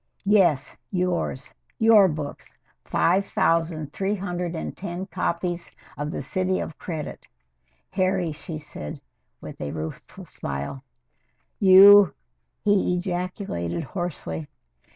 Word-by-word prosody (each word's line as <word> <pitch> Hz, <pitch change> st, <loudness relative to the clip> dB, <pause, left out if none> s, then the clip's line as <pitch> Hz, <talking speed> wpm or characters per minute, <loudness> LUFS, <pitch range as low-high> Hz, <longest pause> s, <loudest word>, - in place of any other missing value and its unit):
"Yes 185 Hz, -9 st, +3 dB
yours 180 Hz, -7 st, -2 dB, 0.2 s
your 220 Hz, -3 st, +7 dB
books 150 Hz, -4 st, -6 dB, 0.3 s
five 185 Hz, +4 st, +2 dB
thousand 165 Hz, -3 st, 0 dB
three 200 Hz, +2 st, -1 dB
hundred 180 Hz, -3 st, -3 dB
and 160 Hz, -, -5 dB
ten 180 Hz, 0 st, -5 dB
copies 175 Hz, -2 st, -3 dB, 0.2 s
of 145 Hz, +1 st, -3 dB
'The -, -, -4 dB
City 185 Hz, -1 st, 0 dB
of 155 Hz, -, -6 dB
Credit,' 160 Hz, -4 st, -6 dB, 0.6 s
Harry," 185 Hz, -3 st, +1 dB
she 160 Hz, +1 st, -7 dB
said, 150 Hz, -, -8 dB, 0.4 s
with -, -, -9 dB
a 75 Hz, -, -3 dB
rueful 80 Hz, +1 st, -7 dB
smile. 70 Hz, 0 st, -5 dB, 0.8 s
"You 195 Hz, -1 st, +8 dB, 0.2 s
" -, -, -51 dB
he 200 Hz, -3 st, +3 dB
ejaculated 175 Hz, -, -3 dB
hoarsely. 115 Hz, -, -5 dB
175 Hz, 110 wpm, -25 LUFS, 150-190 Hz, 0.8 s, You